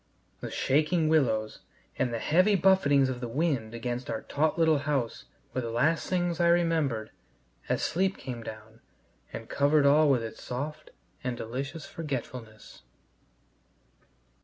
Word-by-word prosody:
The - - -6
shaking 155 +3 +1
willows 115 -9 +1 0.4
and 125 - 0
the 115 - -2
heavy 185 - +3
buffetings 155 -8 +4
of 130 -1 -3
the 120 - -3
wind 120 -4 -1
against 120 +2 -4
our 110 - -3
taut 155 +3 0
little 160 -3 +4
house 140 -5 -2 0.3
were 130 - -1
the 115 - -4
last 140 +8 +1
things 175 -2 0
I 170 - +4
remembered 165 -10 +1 0.6
as - - 0
sleep 190 +2 0
came 125 -3 -6
down 110 0 -10 0.5
and 115 - -7
covered 145 +1 +3
all 150 +2 +5
with 125 -4 +3
its 110 - -7
soft 140 +5 -5 0.3
and 125 -1 -2
delicious 135 +8 -5
forgetfulness. 125 -7 -7
140 Hz, 140 wpm, -28 LUFS, 120-160 Hz, 0.6 s, all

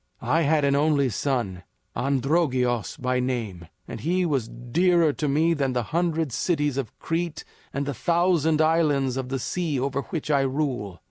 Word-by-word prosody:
I 145 +8 +1
had 150 -1 +2
an 140 0 +2
only 145 -2 +2
son, 115 -6 -2 0.3
Androgeos 130 -3 0
by 125 0 0
name, 115 -10 -3 0.2
and - - -6
he 180 +3 0
was 135 -8 0
dearer 160 +7 +2
to 150 - -2
me 155 +4 +3
than 135 -4 0
the 125 -1 0
hundred 165 -3 0
cities 150 +1 0
of 135 -5 -4
Crete 165 0 -3 0.3
and 140 +1 -2
the 145 - -2
thousand 165 0 +2
islands 150 -5 +2
of 130 -1 -3
the 135 - -1
sea 155 +1 -2
over 140 +1 -1
which 155 +1 -4
I 140 -2 +4
rule. 130 - -2
140 Hz, 165 wpm, -25 LUFS, 125-160 Hz, 0.3 s, I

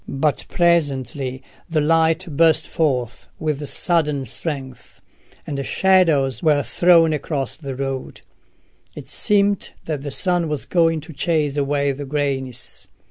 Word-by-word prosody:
But 140 +2 -1
presently 135 -6 0 0.3
the 160 -2 +1
light 165 +3 +2
burst 160 0 +3
forth 125 -7 -1
with 150 -2 -2
sudden 150 -6 +1
strength, 130 -1 -7 0.5
and 140 -2 -3
shadows 155 - +2
were 150 -2 +3
thrown 170 -2 +4
across 145 -3 -3
the 140 -4 -7
road. 135 -1 -5 0.7
It - - -9
seemed 205 -1 +1
that 150 -4 -3
the 145 - -5
sun 175 +3 +1
was 150 -2 -3
going 165 -2 +2
to 160 - -11
chase 150 -2 0
away 140 0 0
the 140 +1 -6
greyness. 135 -4 -3
150 Hz, 130 wpm, -21 LUFS, 135-165 Hz, 0.7 s, thrown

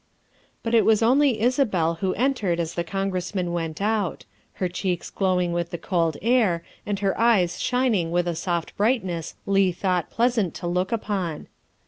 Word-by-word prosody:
' - - -37
' - - -39
But 230 - -2
it 230 - +6
was 220 0 +4
only 260 0 +4
Isabel 205 - +1
who 190 -1 0
entered 220 -9 0
as 165 -1 -2
the 170 - -2
Congress 195 +1 -3
man 180 -2 -1
went 165 -2 -3
out 210 -2 -1 0.3
her 185 - -1
cheeks 180 -1 -3
glowing 180 -3 +1
with 170 0 -1
the 170 - -4
cold 165 -2 0
air 220 -8 +2 0.2
and 205 -1 -1
her 195 -1 0
eyes 215 -7 +3
shining 245 -9 +1
with 175 +1 0
a 175 - 0
soft 170 0 -3
brightness 195 -7 0
Leigh 195 -1 +3
thought 180 -1 -1
pleasant 230 -6 +1
to - - -6
look 180 +2 -1
upon. 195 -8 -2
190 Hz, 180 wpm, -24 LUFS, 175-220 Hz, 0.3 s, it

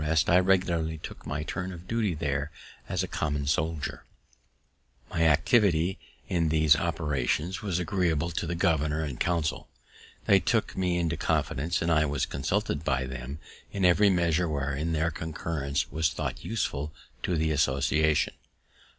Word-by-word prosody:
[Illustration: 80 +2 +2
"I 90 - +7
regularly 85 -4 +1
took - - -9
my 75 +1 -2
turn 90 +3 -4
of 90 0 -10
duty 110 -6 0
there 75 -1 -2 0.4
as - - 0
a - - -3
common 75 -2 -2
soldier"] 80 +1 -1 1.1
My 80 0 +2
activity 90 - +3 0.3
in 85 -3 +1
these 80 -1 +5
operations 80 +3 -1
was 95 -6 -1
agreeable 85 -3 0
to 80 - -3
the 85 - -2
governor 80 -2 +1
and 70 -5 -5
council; 85 -3 -1 0.6
they - - +6
took - - 0
me 90 -2 0
into 85 -2 0
confidence, 80 +7 0
and 85 - +1
I 80 -1 +3
was 75 +1 0
consulted 70 +2 -1
by 65 -3 0
them 65 +2 -6 0.3
in 100 -2 0
every 100 +4 +5
measure 85 -2 +2
wherein 75 +2 -1
their 80 +1 +1
concurrence 75 -3 -3
was 80 +2 +1
thought - - -4
useful 75 -10 -2 0.3
to 90 - 0
the 80 0 +1
association. 75 +2 +2
80 Hz, 150 wpm, -28 LUFS, 75-85 Hz, 1.1 s, I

